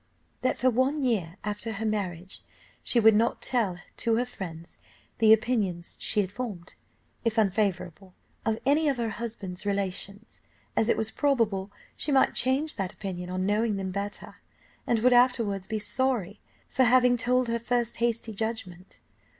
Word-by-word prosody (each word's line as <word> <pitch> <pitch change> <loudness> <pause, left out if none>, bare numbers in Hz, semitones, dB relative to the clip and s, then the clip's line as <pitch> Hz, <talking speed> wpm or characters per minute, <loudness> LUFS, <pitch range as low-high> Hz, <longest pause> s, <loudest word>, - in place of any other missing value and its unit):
"That 255 - +1
for 255 0 +3
one 265 +5 +1
year 195 -8 0
after 210 +2 -3
her 220 +2 -4
marriage, 190 -4 -3 0.4
she 240 - +2
would 220 -1 +7
not 225 +3 +2
tell 215 -8 0 0.2
to 230 -1 +1
her 245 +2 +1
friends 170 -8 -9 0.4
the 220 -1 +6
opinion 215 -6 +2 0.2
she 210 - +2
had 190 -2 -4
formed, 205 -6 -6 0.5
if 230 -1 0
unfavourable, 190 -3 0 0.3
of 220 -1 0
any 295 +3 +3
of 275 - 0
her 230 -2 -1
husband's 210 -5 -6
relations, 200 +1 -4 0.3
as 220 - +2
it - - +3
was 220 0 0
probable 220 -10 0 0.2
she 300 - -1
might 270 -1 +4
change 270 +4 +1
that 190 -3 -2
opinion 180 -3 -6
on 185 0 -2
knowing 210 +2 +1
them 190 -1 -3
better, 200 +2 -5 0.5
and 235 - +3
would 250 +1 +5
afterwards 230 -6 +3
be 220 - -2
sorry 215 -3 -1 0.3
for 260 - +2
having 250 0 +5
told 250 +1 +1
her 235 0 -1
first 240 0 -1
hasty 230 -1 -1
judgment. 195 -4 -5
220 Hz, 160 wpm, -27 LUFS, 195-245 Hz, 0.5 s, would